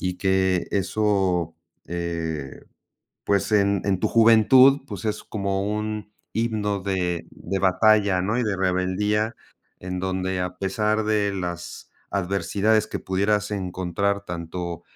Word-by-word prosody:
y 90 Hz, -1 st, -2 dB
que 95 Hz, -1 st, +1 dB
eso, 95 Hz, -4 st, +1 dB, 0.3 s
eh, 85 Hz, -5 st, -4 dB, 0.6 s
pues, 100 Hz, +1 st, +1 dB
en 100 Hz, -2 st, +3 dB
en 95 Hz, -2 st, 0 dB
tu -, -, +1 dB
juventud, 115 Hz, +5 st, +6 dB
pues, -, -, -7 dB
es 105 Hz, -1 st, -2 dB
como 100 Hz, -2 st, -2 dB
un 105 Hz, 0 st, -3 dB, 0.2 s
himno 105 Hz, -3 st, -1 dB
de 90 Hz, -3 st, -2 dB
de 95 Hz, +3 st, -4 dB
batalla, 100 Hz, 0 st, +4 dB
¿no?, 105 Hz, +5 st, 0 dB
y 125 Hz, -, +1 dB
de 105 Hz, -4 st, -1 dB
rebeldía, 95 Hz, +4 st, 0 dB, 0.4 s
en 90 Hz, 0 st, -5 dB
donde 95 Hz, 0 st, -2 dB
a 90 Hz, 0 st, -3 dB
pesar 105 Hz, +3 st, 0 dB
de 105 Hz, -2 st, +1 dB
las 90 Hz, -2 st, -6 dB, 0.2 s
adversidades 100 Hz, +3 st, +1 dB
que -, -, -4 dB
pudieras 100 Hz, +2 st, 0 dB
encontrar 100 Hz, +1 st, -2 dB
tanto 85 Hz, -1 st, -5 dB
100 Hz, 130 wpm, -24 LUFS, 90-105 Hz, 0.6 s, juventud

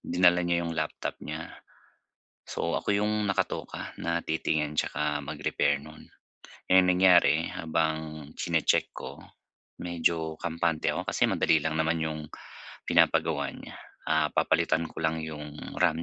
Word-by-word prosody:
dinala 90 Hz, 0 st, +3 dB
niya 85 Hz, -1 st, 0 dB
yung 85 Hz, -, -3 dB
laptop 80 Hz, -1 st, -3 dB
niya. 80 Hz, +2 st, -6 dB, 1.0 s
So, -, -, -1 dB
ako 100 Hz, -, 0 dB
yung 105 Hz, 0 st, +1 dB
nakatoka 95 Hz, -, -2 dB
na 85 Hz, 0 st, -1 dB
titingin 75 Hz, -1 st, 0 dB
'tsaka 75 Hz, -1 st, -1 dB
mag-repair 70 Hz, 0 st, -1 dB
nun. 75 Hz, 0 st, -13 dB, 0.6 s
Eh, 95 Hz, 0 st, +6 dB
ang 90 Hz, -, +2 dB
nangyari 90 Hz, -3 st, +5 dB
habang 80 Hz, -2 st, -2 dB
chini-check -, -, +1 dB
ko, -, -, -9 dB, 0.6 s
medyo 80 Hz, -2 st, -1 dB
kampante 85 Hz, -1 st, -1 dB
ako -, -, -4 dB
kasi -, -, +1 dB
madali 80 Hz, -3 st, +3 dB
lang 80 Hz, 0 st, -1 dB
naman 80 Hz, +1 st, +2 dB
yung 80 Hz, -1 st, -3 dB, 0.6 s
pinapagawa -, -, +2 dB
niya. -, -, -10 dB, 0.3 s
Ah, -, -, +2 dB
papalitan 80 Hz, +1 st, +2 dB
ko -, -, -10 dB
lang 80 Hz, 0 st, 0 dB
yung 75 Hz, -1 st, -7 dB, 0.2 s
RAM 80 Hz, +2 st, +2 dB
80 Hz, 135 wpm, -28 LUFS, 80-85 Hz, 1.0 s, Eh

